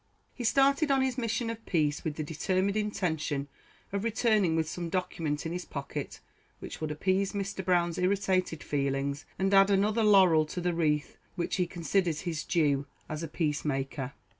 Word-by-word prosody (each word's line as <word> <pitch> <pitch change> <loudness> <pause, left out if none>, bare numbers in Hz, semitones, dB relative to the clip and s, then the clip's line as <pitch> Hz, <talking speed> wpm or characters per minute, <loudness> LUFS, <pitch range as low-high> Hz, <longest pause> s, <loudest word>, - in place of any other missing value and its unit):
He 245 - -6
started 275 +5 +3
on 270 -1 +3
his 260 -2 0
mission 230 0 -1
of 225 0 -8
peace 150 -4 +1
with 155 -2 -2
the 155 - -3
determined 185 +6 0
intention 160 -9 -1 0.5
of 200 0 -1
returning 215 -6 +2
with 160 -1 +1
some 170 +1 -4
document 165 -4 -2
in 165 - -2
his 180 +1 -3
pocket 140 -1 -6 0.4
which - - -9
would 155 - -2
appease 190 +6 0
Mr. 195 -1 -3
Brown's 175 -2 +1
irritated 185 -3 +1
feelings, 140 0 -1
and 195 +1 +1
add 195 0 +7
another 205 +3 +2
laurel 185 -7 +6
to 180 - -5
the 175 0 0
wreath 150 -3 0 0.2
which 175 - -2
he 180 -2 +1
considered 175 -1 0
his 165 -4 -3
due 145 -5 +1 0.2
as 155 0 -4
a 165 - -3
peace 155 -1 -1
maker. 135 -2 -3
175 Hz, 175 wpm, -29 LUFS, 155-200 Hz, 0.5 s, add